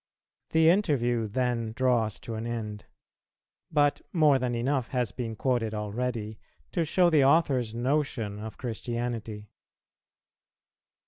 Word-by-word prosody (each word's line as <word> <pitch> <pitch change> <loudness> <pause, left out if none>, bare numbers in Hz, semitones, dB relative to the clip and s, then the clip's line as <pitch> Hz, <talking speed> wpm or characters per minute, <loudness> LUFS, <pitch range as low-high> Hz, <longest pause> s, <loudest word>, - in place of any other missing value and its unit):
The 160 0 +4
interview 130 - +2
then 115 0 -1
draws 120 -4 +1
to 115 - -6
an 110 +1 -4
end; 110 -3 -5 0.9
but 145 -2 +2
more 150 -6 +4
than 125 -1 -1
enough 130 +1 0
has 125 -4 -1
been 115 -3 -5
quoted 115 -2 0
already 110 0 -3 0.3
to 170 - 0
show 175 +3 +3
the 150 -3 +5
author's 135 -6 +3
notion 120 -5 -1
of 110 +1 -7
Christianity. 115 -3 -4
120 Hz, 120 wpm, -28 LUFS, 110-135 Hz, 0.9 s, the